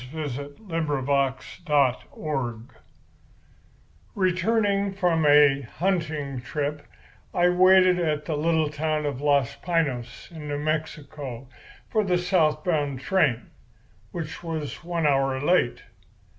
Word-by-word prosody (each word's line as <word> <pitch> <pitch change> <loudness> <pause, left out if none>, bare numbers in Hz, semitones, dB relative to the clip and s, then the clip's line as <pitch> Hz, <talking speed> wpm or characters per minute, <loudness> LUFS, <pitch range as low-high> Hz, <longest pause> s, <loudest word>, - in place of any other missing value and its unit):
III 145 -3 -4 0.2
TELEMACHUS, 140 -4 -1
FRIEND 135 -3 -1 1.5
Returning 200 +1 +1
from 170 -5 +1
a 145 -1 +6 0.2
hunting 155 -8 -1
trip, 145 +3 -4 0.5
I 175 0 +4
waited 185 0 +5
at 150 -3 -1
the 155 - -2
little 160 0 +1
town 155 0 -1
of 140 -2 -3
Los 140 -4 +2
Piños, 155 -7 -2
in 155 -3 -8
New 145 0 -2
Mexico, 145 -4 -4 0.4
for 215 - +1
the 180 -3 +1
south 175 -4 +1
bound 145 -7 -1
train, 150 - +1 0.6
which 165 -2 -6
was 160 -3 -5
one 170 -2 -2
hour 135 -2 +2
late. 145 -4 +1
150 Hz, 110 wpm, -25 LUFS, 140-175 Hz, 1.5 s, a